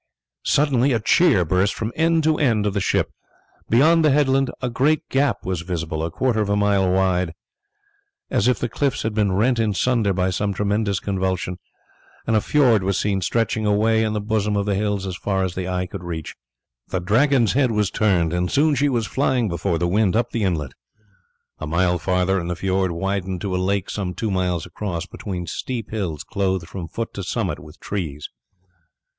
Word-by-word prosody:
Suddenly 140 -2 +3
a 115 - +2
cheer 105 - +4
burst 95 +5 +1
from 115 +1 -4
end 165 0 +2
to 155 0 +2
end 115 -8 +2
of 100 - 0
the 100 - 0
ship. 95 - 0 0.6
Beyond 160 +8 +5
the 155 - +5
headland 135 -2 +3
a 125 - -2
great 140 +6 +1
gap 140 +1 0
was 95 -3 -2
visible 85 -3 -3
a 80 - -1
quarter 115 +5 0
of 105 - -1
a 100 - +2
mile 100 -2 +2
wide, 90 -3 +1 1.0
as 105 - +2
if 125 - +3
the 120 - -2
cliffs 135 +4 -1
had 110 - -1
been 105 -2 +1
rent 115 +5 +2
in 110 -3 +1
sunder 115 -3 +2
by 90 0 0
some 100 +2 -1
tremendous 100 0 0
convulsion, 95 -2 -2 0.7
and 115 - +1
a 105 - +3
fiord 125 -5 +3
was 95 +1 0
seen 100 -2 0
stretching 110 +3 0
away 110 +2 +3
in 110 -1 -1
the 105 - -1
bosom 105 0 0
of 100 - 0
the 105 - 0
hills 100 -1 -1
as 95 -2 -4
far 95 0 -1
as 95 -2 -2
the 95 0 -4
eye 90 0 -1
could 90 0 -8
reach. 80 -3 -6 0.5
The 95 - -2
Dragon's 120 +5 +3
head 130 -2 +3
was 105 -3 0
turned, 90 -6 +1
and 90 0 0
soon 150 +2 +3
she 145 +1 +2
was 120 -4 0
flying 130 -2 0
before 85 0 -1
the 85 +2 0
wind 100 +2 +2
up 120 - +1
the 115 - -2
inlet. 80 -9 -1 0.9
A 80 - -5
mile 90 +2 +1
farther 90 +1 +1
and 85 0 -4
the 90 - -2
fiord 95 +1 0
widened 95 +1 -2
to 95 -3 -2
a - - +1
lake 100 +1 0
some 95 -3 -4
two 110 -3 -2
miles 90 -3 -1
across 90 -5 -4
between 95 -3 -6
steep 115 +6 -5
hills 90 -9 -3
clothed 95 -3 -1
from 95 -2 -6
foot 115 +7 -5
to 100 - -5
summit 90 - -2
with 75 +1 -14
trees. 80 -8 -4
100 Hz, 200 wpm, -22 LUFS, 90-115 Hz, 1.0 s, Beyond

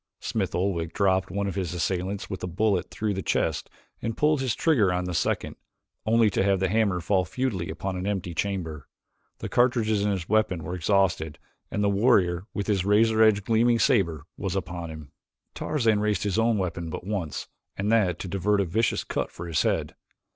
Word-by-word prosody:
Smith - - -2
Oldwick 85 -3 -1
dropped 95 -2 +2
one 100 0 -2
of 100 - -2
his 90 -3 -3
assailants 95 +3 -2
with 95 -3 -6
a - - -3
bullet 95 +1 0
through 105 -1 -2
the 95 - -3
chest - - -1 0.3
and 115 -1 -3
pulled 150 -2 +3
his 125 -6 0
trigger 120 - +3
on 90 0 -1
the 90 - -3
second, 80 - -1 0.5
only 115 0 +4
to 100 - +1
have 100 -1 +2
the 95 0 +1
hammer 100 -3 +2
fall 95 +2 +1
futilely 95 -2 -2
upon 95 +4 -4
an 90 +2 -3
empty 95 -4 -2
chamber. 80 -7 -3 0.5
The - - -5
cartridges 115 -4 +2
in 105 - +1
his 95 -4 -2
weapon 105 -6 +1
were 90 - -5
exhausted 90 -4 +1 0.3
and 105 - -1
the - - +3
warrior 100 -4 +2
with 100 - -3
his 100 -4 +1
razor 110 +2 +3
edged, 105 -2 +4
gleaming 115 +1 +3
saber 95 - +2
was - - -3
upon 85 -1 -4
him. 80 -3 -9 0.4
Tarzan 115 -8 +1
raised 105 -2 0
his 105 +1 0
own 115 -1 +3
weapon 85 -3 -3
but 80 - -6
once 95 -7 -3 0.3
and 100 +2 0
that 95 -7 +3
to - - -5
divert 100 +3 +1
a 100 - +2
vicious 110 +7 0
cut - - -2
for 85 - -8
his 80 -3 +1
head. - - 0
100 Hz, 195 wpm, -26 LUFS, 90-110 Hz, 0.5 s, only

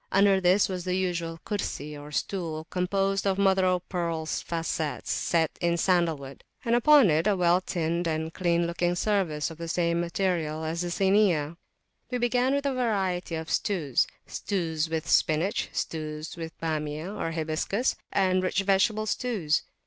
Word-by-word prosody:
Under 195 0 +4
this 185 +3 +4
was 185 -2 -4
the 180 0 -1
usual 170 -3 -2
Kursi, 150 -8 -3
or 145 +1 -10
stool, 160 -2 -3
composed 195 +2 0
of 195 -1 +1
mother 190 -1 +3
o 180 -1 +2
pearl 170 -3 -3
facets 165 -2 -3
set 165 -2 +1
in 170 -1 +2
sandal 170 -3 +2
wood; 135 -1 -11 0.2
and 230 - +1
upon 245 - +6
it 160 +6 +2
a 210 - +3
well 175 0 +3
tinned 170 -1 -1
and 160 0 -2
clean 170 -1 +1
looking 175 +1 0
service 175 -6 0
of 165 - -11
the 170 - -5
same 170 0 +1
material 170 -3 -1
as 165 +2 -2
the 175 - -2
Sini. 180 -4 +2 0.5
We 250 - -1
began 245 +2 +2
with 280 0 -1
a 275 - +1
variety 190 -8 -1
of 160 0 -4
stewsstews 165 - -1
with 160 -1 -2
spinach, 160 +6 +2
stews 155 0 -4
with 165 -1 -8
Bamiyah 160 +3 -3
(hibiscus), 165 +9 0 0.2
and 185 -2 +2
rich 185 +1 0
vegetable 205 +3 +2
stews. 205 -10 0
175 Hz, 155 wpm, -27 LUFS, 160-195 Hz, 0.5 s, upon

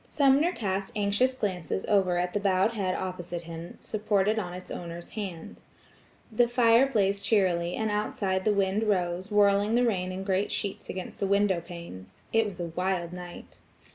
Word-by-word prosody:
Sumner 285 +4 +4
cast 195 - -3
anxious 210 +5 +2
glances 190 -5 -2
over 190 -4 +2
at 180 0 -1
the 205 - +1
bowed 195 +1 +2
head 190 -4 -1
opposite 175 -2 -4
him 165 +1 -8
supported 210 0 +1
on 180 -4 -4
its 180 +1 -9
owner's 170 0 -7
hand. 190 -7 -6 0.7
The 235 +2 +3
fire 240 +1 +5
blazed 200 -5 +1
cheerily, 180 -5 +2
and 220 -1 -1
outside 200 -2 -1
the 215 - +3
wind 200 +2 +1
rose, 185 -2 0
whirling 205 +1 +3
the 245 +1 +4
rain 185 -5 0
in 185 +1 -5
great 195 +1 0
sheets 200 -2 -3
against 185 -1 -6
the 200 - 0
window 200 -3 +2
panes. 170 - -10
It 225 -1 +3
was 190 -3 -8
a 170 -1 -3
wild 180 -2 -1
night. 180 -1 -10
195 Hz, 170 wpm, -28 LUFS, 180-210 Hz, 0.7 s, fire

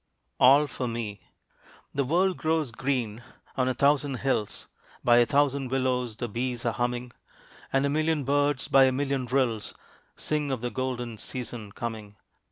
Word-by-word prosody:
ALL 140 +4 +7
FOR 130 -3 -4
ME. 115 -4 -4 0.7
The 140 - +1
world 180 +7 +2
grows 155 -5 0
green 120 -3 -2 0.3
on 130 -2 +1
a 130 - 0
thousand 140 +1 +2
hills 130 -6 -1 0.4
By 120 0 +5
a 120 - +4
thousand 140 -2 +1
willows 125 -3 0
the 120 +1 -4
bees 120 +2 -3
are 115 - +1
humming, 120 0 -2 0.6
And 135 +1 +2
a - - +1
million 155 0 +1
birds 145 0 +1
by 135 -1 +6
a 130 - +3
million 135 -1 -1
rills, 125 -4 0 0.4
Sing 150 -2 -1
of 130 -4 -2
the 120 0 -3
golden 120 -2 -3
season 120 -4 -6
coming. 110 -3 -6
130 Hz, 160 wpm, -27 LUFS, 120-140 Hz, 0.7 s, ALL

